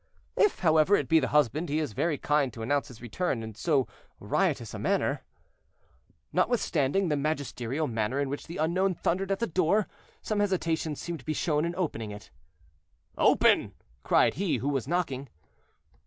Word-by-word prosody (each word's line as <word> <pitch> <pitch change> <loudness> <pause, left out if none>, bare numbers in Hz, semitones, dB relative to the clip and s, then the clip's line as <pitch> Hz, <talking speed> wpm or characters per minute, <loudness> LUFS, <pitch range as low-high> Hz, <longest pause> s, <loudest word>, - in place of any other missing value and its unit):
"If, 420 - +2
however, 160 +2 +4
it - - -1
be 160 0 +5
the 130 - 0
husband 150 +3 +1
he 150 - 0
is 150 -8 -2
very 155 +6 0
kind 145 -3 +1
to 115 - -7
announce 140 +4 0
his 125 -2 -13
return 120 0 -2
in 110 0 -7
so 135 - +1 0.3
riotous - - 0
a - - -5
manner." - - 0 1.1
Notwithstanding 185 - +1
the 150 - +2
magisterial 140 -1 -2
manner 115 +1 -1
in 140 - 0
which 140 +2 -5
the 170 - -7
unknown 180 +4 +1
thundered 190 +4 -1
at 195 - +1
the 235 - 0
door, 185 +3 +1 0.4
some 215 -1 -1
hesitation 165 -6 0
seemed 170 +2 -5
to 125 - -17
be 155 - -1
shown 150 0 0
in 170 +1 -3
opening 130 - -3
it. 105 0 -10 0.8
"Open!" - - +3 0.3
cried - - +3
he 190 -2 0
who 140 - -2
was 135 -3 -1
knocking. 140 -6 -2
155 Hz, 170 wpm, -28 LUFS, 135-175 Hz, 1.1 s, be